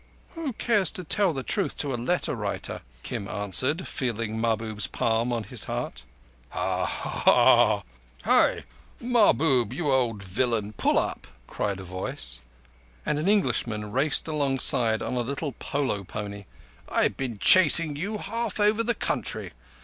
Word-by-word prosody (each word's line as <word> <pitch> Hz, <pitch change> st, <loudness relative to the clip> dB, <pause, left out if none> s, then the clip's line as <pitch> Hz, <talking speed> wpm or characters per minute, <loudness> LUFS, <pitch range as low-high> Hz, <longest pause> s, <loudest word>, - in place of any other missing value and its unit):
"Who 325 Hz, -6 st, -4 dB
cares 210 Hz, -6 st, +1 dB
to 185 Hz, -, -5 dB
tell 180 Hz, 0 st, +1 dB
truth 200 Hz, +6 st, -1 dB
to 140 Hz, -3 st, -2 dB
a -, -, 0 dB
letter 125 Hz, +10 st, -1 dB
writer?" 105 Hz, -5 st, -4 dB, 0.2 s
Kim 100 Hz, -, -5 dB
answered, 130 Hz, -, -1 dB
feeling 115 Hz, -3 st, -3 dB
Mahbub's 110 Hz, -2 st, -1 dB
palm 115 Hz, +2 st, 0 dB
on 115 Hz, -2 st, -1 dB
his -, -, 0 dB
heart. -, -, -4 dB, 0.5 s
"Hi! -, -, +3 dB, 1.2 s
Mahbub, 160 Hz, -, +3 dB
you 155 Hz, -5 st, -1 dB
old 120 Hz, -6 st, +1 dB
villain, 105 Hz, +2 st, -1 dB
pull -, -, +1 dB
up!" -, -, -2 dB, 0.2 s
cried 100 Hz, +6 st, -3 dB
a -, -, -7 dB
voice, 85 Hz, -10 st, -6 dB, 0.6 s
and 150 Hz, -, 0 dB
an 155 Hz, -, -1 dB
Englishman 115 Hz, -, 0 dB
raced 135 Hz, +7 st, +4 dB
alongside 135 Hz, -6 st, +1 dB
on -, -, -3 dB
a 125 Hz, -, 0 dB
little 140 Hz, +4 st, -3 dB
polo 130 Hz, -8 st, -2 dB
pony. 100 Hz, +1 st, -7 dB, 0.4 s
"I've -, -, +1 dB
been 125 Hz, -5 st, -4 dB
chasing 165 Hz, -, +5 dB
you 200 Hz, +8 st, -3 dB
half 225 Hz, +1 st, -4 dB
over 210 Hz, +2 st, +3 dB
the 235 Hz, +1 st, +1 dB
country. -, -, -3 dB
130 Hz, 135 wpm, -26 LUFS, 105-175 Hz, 1.2 s, chasing